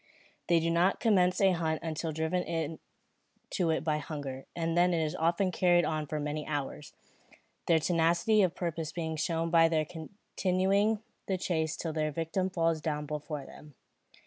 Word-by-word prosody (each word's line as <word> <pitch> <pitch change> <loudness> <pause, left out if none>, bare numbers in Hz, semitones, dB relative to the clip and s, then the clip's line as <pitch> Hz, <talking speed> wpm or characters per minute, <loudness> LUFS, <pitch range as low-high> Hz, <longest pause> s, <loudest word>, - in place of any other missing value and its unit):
They 170 -1 +4
do 165 +1 0
not 175 +3 +2
commence 185 -5 +3
a 195 -1 +5
hunt 160 -3 -1
until 160 0 -3
driven 160 0 -2 0.7
to 175 -4 0
it 160 - 0
by 155 -1 0
hunger, 140 -4 -6
and 165 -1 -1
then 175 0 +4
it 160 -1 +1
is 155 - -3
often 170 +3 +1
carried 175 -1 +3
on 155 -1 -2
for 155 +1 -3
many 150 +1 -3
hours, 145 0 -4 0.8
their 165 - +5
tenacity 170 +6 +3
of 180 -3 +1
purpose 165 -3 -3
being 160 -1 -3
shown 165 +1 -1
by 165 -1 +6
their 155 -2 +1
continuing 195 +5 -1 0.2
the 190 - 0
chase 160 -3 -1
till 165 -2 -3
their 155 -1 0
victim 165 +5 -1
falls 165 -3 0
down 150 -1 -2
before 150 -1 -5
them. 150 0 -14
165 Hz, 170 wpm, -30 LUFS, 155-180 Hz, 0.8 s, by